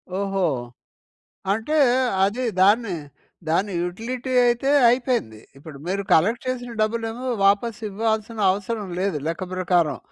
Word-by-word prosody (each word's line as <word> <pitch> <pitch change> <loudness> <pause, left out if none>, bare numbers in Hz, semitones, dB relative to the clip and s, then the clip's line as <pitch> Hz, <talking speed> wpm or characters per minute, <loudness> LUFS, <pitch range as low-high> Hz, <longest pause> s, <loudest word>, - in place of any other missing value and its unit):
ఓహో! 195 -1 -1 1.1
అంటే 225 +9 -1 0.5
అది 225 +6 -1 0.2
దాన్ని 205 +2 +4 0.6
దాని 190 +5 +1
యుటిలిటీ 235 +8 -4
అయితే 240 +3 +1 0.2
అయిపోయింది. 240 - 0 0.2
ఇప్పుడు 140 0 -11
మీరు 195 +2 -1
కలెక్ట్ 225 +10 +3
చేసిన 245 -2 -3
డబ్బులేమో 225 +3 -2 0.2
వాపస్ 205 +3 +2
ఇవ్వాల్సిన 220 +1 -2
అవసరం 205 +1 -4
లేదు 190 -6 0
లెక్క 165 +3 -2
ప్రకారం. 175 -4 +1
210 Hz, 115 wpm, -23 LUFS, 185-235 Hz, 1.1 s, దాన్ని